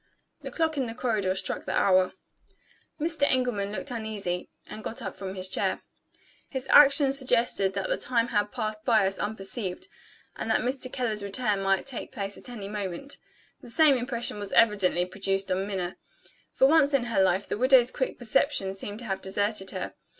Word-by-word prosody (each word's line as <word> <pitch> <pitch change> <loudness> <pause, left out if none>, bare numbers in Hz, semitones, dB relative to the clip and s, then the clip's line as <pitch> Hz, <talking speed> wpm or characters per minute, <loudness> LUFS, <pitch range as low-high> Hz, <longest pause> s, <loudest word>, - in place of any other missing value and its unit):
The - - -6
clock 320 -2 -1
in 260 -3 0
the 225 - -6
corridor 215 -7 0
struck - - -3
the - - -1
hour. 185 -1 +3 0.9
Mr. 320 0 -2
Engelman 245 -6 +1
looked 255 +5 -4
uneasy, 210 -6 -4 0.2
and 215 0 -9
got 230 - -4
up 200 -6 -5
from 190 -1 -6
his 185 0 -2
chair. 185 - -1 0.7
His 265 -2 -4
action 280 -1 +7
suggested 240 -7 +1
that 195 -1 -2
the - - 0
time 240 -2 0
had 205 -2 0
passed 215 0 -4
by 220 -4 +4
us 195 0 -2
unperceived, 205 - -4 0.5
and - - -5
that - - +2
Mr. 255 +1 -1
Keller's 225 -5 -1
return 200 0 -1
might 195 -1 +1
take 265 -4 -4
place 200 -4 -5
at - - -8
any 215 -5 -7
moment. 205 +6 -5 0.4
The - - -12
same 300 +2 +5
impression 240 -3 -3
was 205 -1 -5
evidently 200 -6 +4
produced 195 +1 -1
on 190 +2 0
Minna. 185 -3 -4 0.5
For - - +3
once 290 -1 +4
in 265 - +2
her 230 -5 +1
life, 190 +1 +2
the - - -3
widow's 255 -1 +5
quick 260 - -2
perception 240 -4 +1
seemed 205 +1 -4
to 240 - -7
have 195 -3 -3
deserted 200 0 -1
her. 185 -2 -4
215 Hz, 185 wpm, -27 LUFS, 195-255 Hz, 0.9 s, action